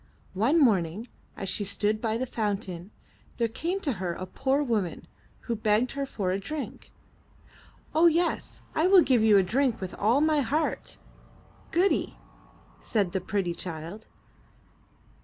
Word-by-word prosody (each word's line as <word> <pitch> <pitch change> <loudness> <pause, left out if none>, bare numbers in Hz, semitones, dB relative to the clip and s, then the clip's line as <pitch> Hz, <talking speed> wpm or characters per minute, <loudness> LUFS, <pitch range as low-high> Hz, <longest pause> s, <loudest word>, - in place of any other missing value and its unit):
One 235 - +3
morning 205 - +2 0.3
as 195 - -4
she 195 +2 -1
stood 210 +2 0
by 225 -1 0
the 255 - -1
fountain, 200 -6 -3 0.5
there 235 - +2
came 335 - -3
to 290 - 0
her 175 -2 -1
a 185 - -6
poor 270 +8 0
woman, 215 -9 -1 0.4
who 235 - -2
begged 215 +3 +1
her 275 0 -3
for 190 -7 -2
a 190 - 0
drink. 295 +9 -6 1.0
*'0h, 335 +2 +6
yes, 340 +2 -1
I 320 +3 +2
will 375 -2 +7
give 255 -4 +3
you 215 -2 +6
a 195 - +5
drink 240 +4 +1
with 185 -1 -5
all 225 +6 +2
my 310 0 +3
heart. 295 +5 -1 0.7
Goody,'' 365 +4 +1 0.6
said 205 -6 0
the 190 0 -1
pretty 185 -2 -1
child. 170 +5 -7
220 Hz, 150 wpm, -27 LUFS, 195-280 Hz, 1.0 s, will